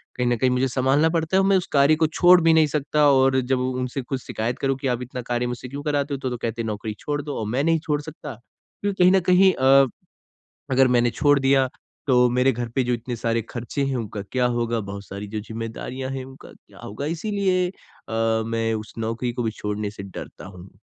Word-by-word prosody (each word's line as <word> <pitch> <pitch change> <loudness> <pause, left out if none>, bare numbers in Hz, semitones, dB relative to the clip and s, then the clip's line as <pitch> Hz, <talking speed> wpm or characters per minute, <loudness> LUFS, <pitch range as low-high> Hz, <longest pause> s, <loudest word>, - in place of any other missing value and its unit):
कहीं 125 - -1
ना 120 - +2
कहीं 130 +2 +2
मुझे 125 +1 +1
संभालना 135 +5 +2
पड़ता 165 +1 -1
है - - +5
और 195 - +2
मैं 195 - +4
उस 185 - -2
कार्य 140 +2 +5
को 160 0 +2
छोड़ 175 +3 +5
भी 165 0 +4
नहीं 160 -1 +5
सकता 150 0 +1
और 130 -1 +4
जब 130 +1 0
उ 130 0 -1
उनसे 125 +2 -3
कुछ 130 +1 -4
शिकायत 115 +3 -3
करूँ 135 -1 0
कि, 135 - -3
"आप 125 -1 -1
इतना 125 0 -6
कार्य 120 0 -2
मुझसे 125 +1 -5
क्यों 140 +2 -6
कराते 145 -1 -1
हो?" - - -1
तो 130 - -3
तो 125 - -4
कहते 115 0 -3
हैं, - - -4
"नौकरी 105 0 -4
छोड़ 145 -1 -3
दो।" 145 0 -6
और 110 - -3
मैं 125 +6 0
नहीं 165 +1 +2
छोड़ 150 -2 -1
सकता। 150 -2 -8 0.5
क्यों 205 0 0
कहीं 180 -1 +4
ना 190 - +5
कहीं 190 +1 +6
अ, 135 +1 +5 0.8
अगर 130 0 +5
मैंने 120 -1 +3
छोड़ 145 +2 +3
दिया, 135 0 +3 0.4
तो 125 -2 +4
मेरे 125 +2 +3
घर 120 -1 -4
पे 130 - +2
जो 125 0 0
इतने 120 +1 -4
सारे 115 0 -1
खर्चे 120 +4 -3
हैं, 135 -1 -1
उनका 110 -4 -4
क्या 125 -1 +1
होगा? 120 -1 0
बहुत 100 -1 -7
सारी 100 +2 -7
जो 105 +1 -4
ज़िम्मेदारियाँ 115 +4 -5
हैं, 135 -1 -5
उनका 135 0 -13
क्या - - -20
होगा? 110 +8 -6
इसीलिए 185 +2 0
अ, - - -9 0.7
मैं 115 0 -1
उस 110 0 -6
नौकरी 115 +2 -2
को 120 - -3
भी 110 - -1
छोड़ने 105 0 -2
से 100 -1 -9
डरता 100 - -9
हूँ, 95 0 -12
130 Hz, 240 wpm, -23 LUFS, 115-145 Hz, 0.8 s, कहीं